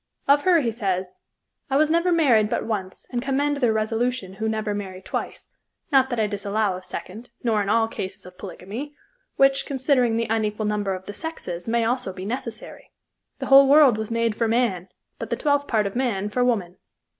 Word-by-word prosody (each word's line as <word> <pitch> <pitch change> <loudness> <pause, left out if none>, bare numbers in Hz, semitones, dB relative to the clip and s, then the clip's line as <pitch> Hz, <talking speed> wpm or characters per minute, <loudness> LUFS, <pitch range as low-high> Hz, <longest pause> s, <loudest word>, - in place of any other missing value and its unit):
Of 285 +1 +4
her 350 -3 +5
he 235 -4 0
says: 190 -4 -3 0.5
"I 270 - +2
was 310 +1 +3
never 335 +2 +2
married 250 -11 +4
but - - -1
once 195 -4 -4
and 240 -2 -1
commend 280 +2 0
their 245 -5 +2
resolution 220 -2 -1
who 220 - 0
never 215 -1 -2
marry 190 -2 -6
twice, 190 - -5 0.4
not 265 -1 +4
that 240 -3 -2
I 215 - +3
disallow 205 -1 -1
of 185 - -9
second, 210 +5 -8
nor 220 -3 +2
in 200 - -2
all 225 +1 +3
cases 190 -3 -7
of 180 0 -12
polygamy, 210 +9 -7 0.4
which, 275 0 +3
considering 260 -4 +1
the 230 - 0
unequal 215 -1 -1
number 205 -2 -1
of 185 0 -9
the 205 - -7
sexes, 195 - -6
may 230 0 +1
also 245 -4 -1
be 185 0 -7
necessary. 230 0 -6 0.5
The - - -5
whole 275 0 +7
world 280 -6 +6
was 220 - -4
made 230 -1 0
for 230 +2 0
man, 220 -6 0 0.3
but - - -5
the - - 0
twelfth 285 -1 +1
part 215 -3 +1
of 200 - -4
man 220 -6 -1
for 250 +4 0
woman. 200 -8 0
225 Hz, 200 wpm, -24 LUFS, 200-265 Hz, 0.5 s, whole